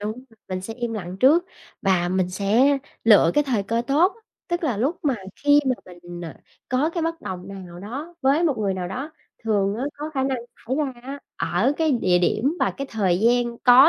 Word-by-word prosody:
Đúng, 215 Hz, +5 st, -5 dB, 0.2 s
mình 185 Hz, -1 st, -3 dB
sẽ 225 Hz, +4 st, -6 dB
im 240 Hz, -1 st, -3 dB
lặng 185 Hz, -4 st, -5 dB
trước 315 Hz, +7 st, +6 dB, 0.4 s
và 185 Hz, -3 st, +2 dB
mình 185 Hz, 0 st, 0 dB
sẽ 225 Hz, +9 st, +3 dB, 0.3 s
lựa 205 Hz, -7 st, +7 dB
cái 295 Hz, -, +3 dB
thời 240 Hz, -7 st, 0 dB
cơ 230 Hz, +4 st, -1 dB
tốt, 335 Hz, +8 st, +3 dB, 0.3 s
tức 345 Hz, 0 st, -1 dB
là 255 Hz, -8 st, 0 dB
lúc 275 Hz, -, 0 dB
mà 280 Hz, -3 st, +3 dB, 0.2 s
khi 290 Hz, 0 st, +5 dB
mà 255 Hz, -, +3 dB
mình, 175 Hz, -1 st, -10 dB
à, 160 Hz, -, -9 dB, 0.3 s
có 265 Hz, +5 st, +1 dB
cái 335 Hz, -1 st, -2 dB
bất 330 Hz, 0 st, -2 dB
đồng 185 Hz, 0 st, -6 dB
nào 185 Hz, -3 st, -9 dB
đó 275 Hz, -, -6 dB
với 280 Hz, +6 st, +3 dB
một 290 Hz, -8 st, +1 dB
người 200 Hz, -3 st, 0 dB
nào 180 Hz, -1 st, -3 dB
đó, 270 Hz, -, -5 dB, 0.3 s
thường 205 Hz, -2 st, +1 dB
á, 250 Hz, -, -2 dB
có 300 Hz, +2 st, -5 dB
khả 265 Hz, -, +1 dB
năng 265 Hz, -2 st, 0 dB, 0.3 s
xảy 260 Hz, -, +1 dB
ra 290 Hz, -3 st, 0 dB
á, 275 Hz, +3 st, -6 dB, 0.2 s
ở 180 Hz, -, +1 dB
cái 320 Hz, -2 st, +2 dB
địa 185 Hz, -8 st, +3 dB
điểm 250 Hz, -, +1 dB
và -, -, +3 dB
cái 275 Hz, -, -4 dB
thời 190 Hz, -5 st, +1 dB
gian 240 Hz, +1 st, +2 dB
có 255 Hz, +4 st, +9 dB
240 Hz, 215 wpm, -23 LUFS, 195-280 Hz, 0.4 s, có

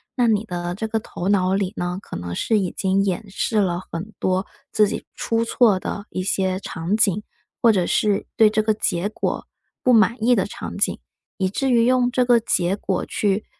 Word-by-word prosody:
那 245 Hz, -2 st, +2 dB
你 215 Hz, -1 st, +2 dB
的 175 Hz, -3 st, -4 dB
这 220 Hz, +3 st, -3 dB
个 225 Hz, 0 st, -1 dB
头 190 Hz, -2 st, -5 dB
脑 190 Hz, -2 st, +2 dB
里 195 Hz, 0 st, -1 dB
呢， 180 Hz, +1 st, -2 dB
可 -, -, -9 dB
能 85 Hz, 0 st, -5 dB
是 220 Hz, -, +1 dB
已 185 Hz, -3 st, -1 dB
经 195 Hz, 0 st, +1 dB
演 195 Hz, +2 st, -2 dB
示 215 Hz, +2 st, 0 dB
了 180 Hz, -3 st, +1 dB
很 180 Hz, +6 st, -5 dB
多， 185 Hz, +1 st, 0 dB, 0.2 s
自 210 Hz, -1 st, +4 dB
己 -, -, -5 dB
出 230 Hz, 0 st, -1 dB
错 225 Hz, -5 st, +3 dB
的 200 Hz, +2 st, -5 dB
一 185 Hz, -, -3 dB
些 190 Hz, -1 st, 0 dB
场 190 Hz, +2 st, -2 dB
景， 210 Hz, -1 st, +2 dB, 0.4 s
或 230 Hz, -, +6 dB
者 185 Hz, -5 st, +1 dB
是 205 Hz, -2 st, +1 dB
对 220 Hz, -3 st, +6 dB
这 215 Hz, 0 st, +1 dB
个 215 Hz, 0 st, +2 dB
结 195 Hz, -3 st, -1 dB
果 215 Hz, -, -3 dB, 0.4 s
不 255 Hz, -, +4 dB
满 225 Hz, +1 st, +5 dB
意 245 Hz, -, +5 dB
的 190 Hz, -, +1 dB
场 -, -, -7 dB
景。 -, -, 0 dB, 0.4 s
以 190 Hz, -2 st, +1 dB
至 270 Hz, +7 st, -1 dB
于 235 Hz, -1 st, +4 dB
用 250 Hz, -1 st, +3 dB
这 250 Hz, 0 st, +2 dB
个 240 Hz, -1 st, +5 dB
结 185 Hz, -4 st, 0 dB
果 190 Hz, -2 st, -2 dB
去 205 Hz, 0 st, -1 dB
205 Hz, 225 characters per minute, -22 LUFS, 185-225 Hz, 0.4 s, 或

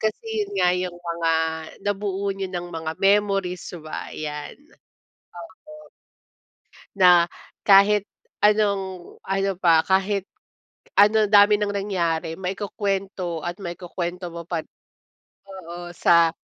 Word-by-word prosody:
Kasi 220 Hz, -, -2 dB, 0.2 s
yun 405 Hz, -, -13 dB
nga 180 Hz, -, +4 dB
yung 180 Hz, -1 st, -3 dB
mga 170 Hz, -1 st, -2 dB, 0.5 s
nabuo 200 Hz, -1 st, -2 dB
niyo 195 Hz, -1 st, -5 dB
ng 175 Hz, -1 st, -5 dB
mga 160 Hz, -1 st, -4 dB
memories 195 Hz, -2 st, +2 dB, 0.2 s
'ba, 155 Hz, 0 st, -7 dB
yan, 150 Hz, -1 st, -6 dB, 0.8 s
opo. 305 Hz, -, -14 dB, 1.1 s
Na 180 Hz, -2 st, +6 dB, 0.4 s
kahit 200 Hz, +1 st, +6 dB, 0.3 s
anong 200 Hz, -3 st, 0 dB
ano 195 Hz, 0 st, 0 dB
pa 165 Hz, -3 st, +4 dB
kahit 195 Hz, +2 st, +1 dB, 0.8 s
ano 215 Hz, +1 st, +6 dB
dami 205 Hz, 0 st, +7 dB
ng 205 Hz, 0 st, -1 dB
nangyari 170 Hz, -5 st, -1 dB
maikukuwento 195 Hz, -2 st, -3 dB
at 175 Hz, -, -3 dB
maikukuwento 175 Hz, 0 st, -5 dB
mo 170 Hz, 0 st, -8 dB
pa 170 Hz, 0 st, -3 dB
rin, -, -, -37 dB, 0.7 s
oo. 175 Hz, -2 st, -9 dB
Sa 170 Hz, -1 st, +4 dB
190 Hz, 115 wpm, -23 LUFS, 175-200 Hz, 1.1 s, dami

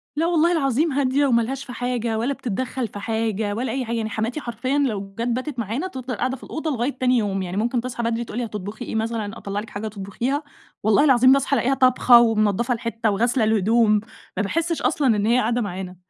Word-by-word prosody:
لا 315 Hz, +3 st, +1 dB
والله 340 Hz, 0 st, +3 dB
العظيم 295 Hz, -1 st, +1 dB
هادية 275 Hz, +1 st, +2 dB
وما 235 Hz, -4 st, +3 dB
لهاش 270 Hz, +4 st, -4 dB
في 245 Hz, -, -8 dB
حاجة 240 Hz, -2 st, -2 dB
ولا 245 Hz, +5 st, 0 dB
بتتدخل 255 Hz, +1 st, -3 dB
في 205 Hz, -1 st, -9 dB
حاجة 220 Hz, -1 st, -1 dB
ولا 235 Hz, +1 st, -2 dB
أي 260 Hz, 0 st, -2 dB
حاجة، 235 Hz, +1 st, -2 dB
يعني 220 Hz, -1 st, -2 dB
حماتي 230 Hz, +7 st, -2 dB
حرفيًا 250 Hz, +4 st, -2 dB
لو 200 Hz, -8 st, -1 dB
جت 235 Hz, -, 0 dB
باتت 255 Hz, +2 st, -3 dB
معانا 235 Hz, -, -2 dB
تفضل 260 Hz, -6 st, -5 dB
قاعدة 255 Hz, +5 st, -2 dB
في -, -, -17 dB
الأوضة 315 Hz, -1 st, -3 dB
لغاية 255 Hz, +2 st, -2 dB
تاني 255 Hz, -1 st, +3 dB
يوم، 195 Hz, -3 st, -1 dB
يعني 180 Hz, +1 st, -4 dB
ممكن 235 Hz, +3 st, 0 dB
تصحى 245 Hz, -1 st, -4 dB
بدري 230 Hz, 0 st, -1 dB
تقول 225 Hz, -, -7 dB
لي 245 Hz, -, -1 dB
هتطبخي 210 Hz, 0 st, -6 dB
إيه -, -, -5 dB
مثلًا 220 Hz, -1 st, -2 dB
أطلع 200 Hz, +1 st, -4 dB
لِك 225 Hz, -, -8 dB
حاجة 205 Hz, +2 st, -5 dB
تطبخيها، 220 Hz, +8 st, -3 dB, 0.4 s
والله 215 Hz, +5 st, +4 dB
العظيم 260 Hz, -2 st, +6 dB
باصحى 275 Hz, 0 st, +2 dB
ألاقيها 265 Hz, +1 st, +1 dB
طابخة 255 Hz, -2 st, +6 dB
ومنضفة 225 Hz, +1 st, +2 dB
الحتة 230 Hz, -1 st, -2 dB
وغاسلة 235 Hz, +4 st, +1 dB
الهدوم. 220 Hz, 0 st, +3 dB, 0.4 s
ما 205 Hz, -, +1 dB
باحسش 330 Hz, -, -1 dB
أصلًا 285 Hz, -, +1 dB
إن 205 Hz, 0 st, 0 dB
هي 235 Hz, +3 st, +3 dB
قاعدة 240 Hz, +1 st, +1 dB
معانا، 185 Hz, -2 st, -5 dB
235 Hz, 215 wpm, -23 LUFS, 215-260 Hz, 0.4 s, العظيم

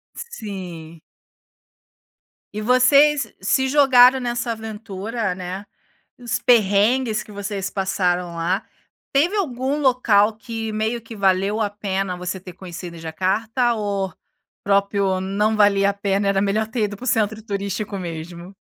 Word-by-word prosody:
Sim. 180 Hz, -, -8 dB, 1.5 s
E 215 Hz, -, -3 dB
vocês 275 Hz, +4 st, +4 dB
se 265 Hz, +7 st, +1 dB
jogaram 260 Hz, -2 st, +6 dB
nessa 240 Hz, -1 st, -2 dB
aventura, 220 Hz, -1 st, -4 dB
né, 185 Hz, +2 st, -6 dB, 0.5 s
nos 240 Hz, -3 st, -2 dB
perrengues 220 Hz, +1 st, +3 dB
que -, -, -16 dB
vocês 200 Hz, -1 st, -4 dB
passaram 180 Hz, -3 st, -1 dB
lá. 180 Hz, +5 st, -1 dB, 0.5 s
Teve 335 Hz, +9 st, +2 dB
algum 270 Hz, -5 st, -1 dB
local 225 Hz, -5 st, +3 dB
que 225 Hz, -1 st, -5 dB
meio 220 Hz, +2 st, -1 dB
que 225 Hz, 0 st, -11 dB
valeu 195 Hz, +1 st, +1 dB
a 210 Hz, -, +1 dB
pena 195 Hz, -2 st, -3 dB
você 180 Hz, +1 st, -5 dB
ter 180 Hz, -1 st, -11 dB
conhecido 175 Hz, -2 st, -8 dB
em -, -, -10 dB
Jacarta, 215 Hz, +9 st, 0 dB
ou 200 Hz, -3 st, -2 dB
o -, -, -17 dB, 0.5 s
próprio 200 Hz, -1 st, +1 dB
não 210 Hz, +3 st, 0 dB
valia 200 Hz, -1 st, +4 dB
a 200 Hz, -, -4 dB
pena, 200 Hz, 0 st, 0 dB
era 195 Hz, -1 st, +2 dB
melhor 205 Hz, +2 st, 0 dB
ter 225 Hz, -2 st, -1 dB
ido 205 Hz, 0 st, -4 dB
para 250 Hz, -, -10 dB
o -, -, -6 dB
centro 220 Hz, -1 st, 0 dB
turístico 200 Hz, -1 st, -4 dB
mesmo? 170 Hz, +2 st, -7 dB
205 Hz, 140 wpm, -21 LUFS, 190-230 Hz, 1.5 s, jogaram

